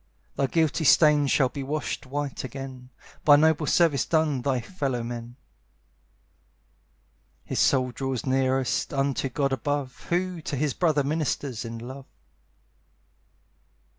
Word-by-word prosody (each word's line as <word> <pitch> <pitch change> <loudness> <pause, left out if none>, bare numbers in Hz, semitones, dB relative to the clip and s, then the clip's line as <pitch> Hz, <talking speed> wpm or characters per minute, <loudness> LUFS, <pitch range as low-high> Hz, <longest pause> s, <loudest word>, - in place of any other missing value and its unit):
"Thy 135 - +1
guilty 160 +1 +1
stains 150 -2 +5
shall 130 -2 +3
be 140 - -6
washed 145 -1 -4
white 145 +1 -4
again, 130 -1 -8 0.3
By 145 - +8
noble 155 0 +3
service 165 -5 +3
done 155 -5 +1
thy 130 0 0
fellow 130 -2 -3
men. 120 0 -6 2.1
"His - - -3
soul 130 -2 +3
draws 135 0 -3
nearest 130 +1 0
unto 135 -1 0
God 140 +1 0
above, 135 +1 -3
Who 180 0 -1
to 150 - -4
his 145 0 0
brother 155 -5 +2
ministers 140 -4 -2
in 115 0 -6
love." 130 +4 -9
140 Hz, 125 wpm, -26 LUFS, 130-150 Hz, 2.1 s, By